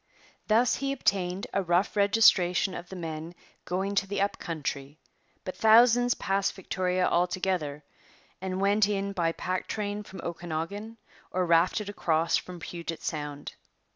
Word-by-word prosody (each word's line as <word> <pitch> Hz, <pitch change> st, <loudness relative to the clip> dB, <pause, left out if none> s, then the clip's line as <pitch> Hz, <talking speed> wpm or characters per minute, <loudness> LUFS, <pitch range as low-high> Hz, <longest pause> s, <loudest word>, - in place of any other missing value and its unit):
Thus 230 Hz, +3 st, +3 dB
he 275 Hz, 0 st, -2 dB
obtained 190 Hz, -7 st, 0 dB
a 195 Hz, -, +2 dB
rough 180 Hz, +3 st, +1 dB
registration 200 Hz, -3 st, +4 dB
of 175 Hz, 0 st, -7 dB
the 190 Hz, -, -8 dB
men 165 Hz, -1 st, -6 dB, 0.3 s
going 190 Hz, +3 st, -2 dB
to 200 Hz, 0 st, +1 dB
the 200 Hz, -, -3 dB
up 200 Hz, +1 st, 0 dB
country; 145 Hz, -3 st, -4 dB, 0.5 s
but 185 Hz, -, -5 dB
thousands 240 Hz, +2 st, +5 dB
passed 195 Hz, 0 st, 0 dB
Victoria 185 Hz, -1 st, 0 dB
altogether 175 Hz, -4 st, 0 dB, 0.6 s
and 185 Hz, 0 st, -3 dB
went 200 Hz, +1 st, +3 dB
in 200 Hz, -1 st, -1 dB
by 170 Hz, -3 st, +1 dB
pack 185 Hz, +2 st, -3 dB
train 205 Hz, -1 st, -3 dB
from 190 Hz, -3 st, -10 dB
Okanagan 175 Hz, +6 st, -5 dB, 0.3 s
or 185 Hz, 0 st, 0 dB
rafted 175 Hz, +5 st, +2 dB
across 165 Hz, -5 st, +1 dB
from 180 Hz, -1 st, -4 dB
Puget 170 Hz, 0 st, -6 dB
Sound. 145 Hz, -2 st, -5 dB
185 Hz, 140 wpm, -28 LUFS, 170-200 Hz, 0.6 s, thousands